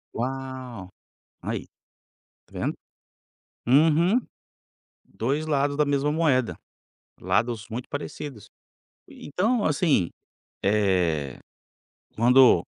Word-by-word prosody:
Uau! 130 -5 -5 0.5
Aí - - -4 0.8
tá - - -31
vendo? - - -1 0.9
Uhum, 160 - +5 0.9
2 140 +7 -2
lados 145 -1 +1
da 150 - +3
mesma 145 +1 +1
moeda, 145 -7 +1 0.6
lados 115 -2 0
muito 120 +2 -6
parecidos. 145 -5 -6 0.6
Então, 210 - -1
assim, 145 - +2 0.5
eh, 90 -9 +1 0.8
quando 125 +3 +6
130 Hz, 80 wpm, -25 LUFS, 110-150 Hz, 0.9 s, quando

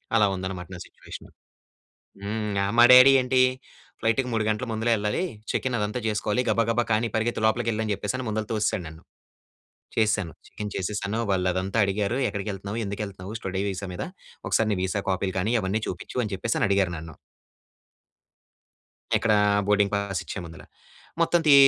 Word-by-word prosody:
అలా 105 - +5
ఉందన్నమాట 95 -1 -5
నా 90 - -8
సిట్యువేషను. - - -12 0.9
హ్మ్, 105 0 -2
ఆహ్, 100 - -1
మా 120 - +9
డ్యాడీ 130 +2 +10
ఏంటి, 130 0 +2 0.6
"ఫ్లైట్‌కి 115 +3 +1
3 110 -1 +1
గంటల 110 +4 -1
ముందులే 110 +2 +1
వెళ్ళాలి. 105 - -1 0.3
చెక్ - - -1
ఇన్ 120 - 0
అదంతా 105 +4 -2
చేసుకోవాలి 105 +3 0
గబగబా 115 +2 +2
కానీ 110 +2 +2
పరిగెత్తి 110 0 -1
లోపలికి 115 +1 +1
వేళ్లు" 110 0 -1
అని 105 - 0
చెప్పేసి 105 +6 -3
ముందులు 110 0 -2
తోసేసాడు 105 -4 0
నన్ను. 80 +1 -11 1.0
చేసేశాను. 105 -6 +1
చెక్ - - -19
ఇన్ 105 - -4
చేసేసాను. 100 +3 -2
వాళ్ళు 90 -1 +1
అదంతా 95 +4 -2
అడిగారు. 100 +5 -1
"ఎక్కడికి 100 0 -4
వెళ్తున్నావు? 100 +3 -5
ఎందుకు 100 +1 -4
వెళ్తున్నావు 95 +1 -8
స్టడీ 95 0 -2
వీసా 95 0 -5
మీద? - - -4 0.4
ఒకసారి 110 -1 +2
నీ 100 - 0
వీసా 95 +2 -1
కాపీలు 95 0 -2
కానీ 110 +6 0
అవన్నీ 100 +4 -1
చూపించు?" 90 +7 -6
అని 105 - -6
చెప్పేసని 110 +3 0
అడిగారు 95 -3 +2
నన్ను. 80 -1 -9 2.0
ఎక్కడ 110 -2 +2 0.3
బోర్డింగ్ 105 -1 +3
పాస్ 100 -1 -2
ఇచ్చేముందల. 85 -4 -7 0.6
మొత్తం 170 +1 +3
తీ 145 - +8
105 Hz, 165 wpm, -25 LUFS, 95-110 Hz, 2.0 s, డ్యాడీ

